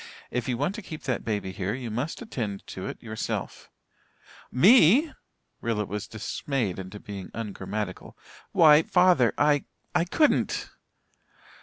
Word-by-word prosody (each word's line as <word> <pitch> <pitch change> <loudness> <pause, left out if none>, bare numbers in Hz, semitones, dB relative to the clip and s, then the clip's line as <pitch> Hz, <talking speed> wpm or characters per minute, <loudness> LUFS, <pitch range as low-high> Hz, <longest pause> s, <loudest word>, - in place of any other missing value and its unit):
If 125 0 -2
you 120 - 0
want 180 - 0
to 220 - -6
keep 160 -5 -9
that 130 -3 -2
baby 105 -4 -2
here 95 +2 -3
you 125 -3 -5
must 140 - -3
attend 110 - -4
to 95 - -6
it - - -8
yourself." 110 -1 -5 0.8
"Me!" 230 - +6 0.5
Rilla 110 -3 -1
was 105 +2 -5
dismayed 110 -2 -3
into 95 +2 -8
being 100 -5 -8
ungrammatical. 105 -2 -5 0.3
"Why 150 -2 +7
father 180 - +4
I 145 -1 +3 0.3
I 175 -1 +2
couldn't!" 300 - +1
120 Hz, 135 wpm, -27 LUFS, 105-160 Hz, 0.8 s, Why